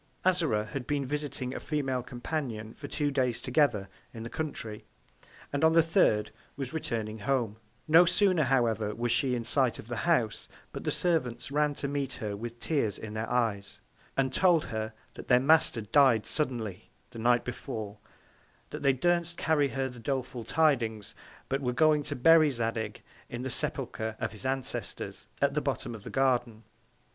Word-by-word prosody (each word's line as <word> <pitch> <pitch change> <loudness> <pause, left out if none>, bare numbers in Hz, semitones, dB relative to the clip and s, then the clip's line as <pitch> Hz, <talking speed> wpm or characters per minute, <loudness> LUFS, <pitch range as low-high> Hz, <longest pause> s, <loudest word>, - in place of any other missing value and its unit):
Azora 160 -13 +3
had 125 +3 -6
been 145 -2 0
visiting 140 -2 -3
a - - -4
Female 135 -4 -1
Companion 120 -3 -5
for 145 - -9
two 145 0 -1
Days 130 -4 0
together 125 -7 +1 0.3
in 115 - -6
the 115 - -7
Country, 115 -9 -5 0.7
and 145 - -1
on 160 0 +5
the 165 0 +6
third 160 - +2 0.3
was 135 0 -4
returning 110 -8 -3
home: 115 -2 -1 0.3
No 165 +3 +7
sooner, 185 -1 +3
however, 115 -5 +1
was 120 0 -1
she 125 +1 +2
in 120 - -3
Sight 125 0 +2
of - - -10
the 120 - -3
House, 120 -10 +1 0.2
but - - -7
the - - +1
Servants 135 -8 0
ran 150 0 +1
to 140 - -2
meet 140 -2 -2
her 105 -4 -4
with 115 +3 -7
Tears 125 -10 0
in 110 -1 -7
their 110 +1 -3
Eyes, 110 -5 -1 0.4
and 130 -1 +1
told 175 -2 +4
her, 110 0 -4 0.2
that - - -10
their 125 -1 +5
Master 150 -3 +4
dy'd 115 0 +4
suddenly 120 - -2 0.2
the 115 - -9
Night 120 +1 +3
before; 110 -3 -6 0.7
that - - -6
they 140 -2 +3
durstn't 170 +4 +1
carry 145 -2 +2
her 135 +1 -2
the 125 -2 -10
doleful 125 -1 -3
Tidings, 115 -7 +1 0.3
but 135 +1 -1
were 125 -2 -1
going 155 +2 +4
to 145 0 -5
bury 155 +3 +6
Zadig 115 -4 -3 0.3
in 120 +1 -5
the 130 - -2
Sepulchre 110 -1 -1
of - - -2
his 110 +4 -6
Ancestors, 135 -1 -3 0.2
at 140 0 +3
the 150 - 0
Bottom 135 -3 -3
of 110 -3 -9
the - - -7
Garden. 120 -4 0
130 Hz, 175 wpm, -29 LUFS, 115-145 Hz, 0.7 s, No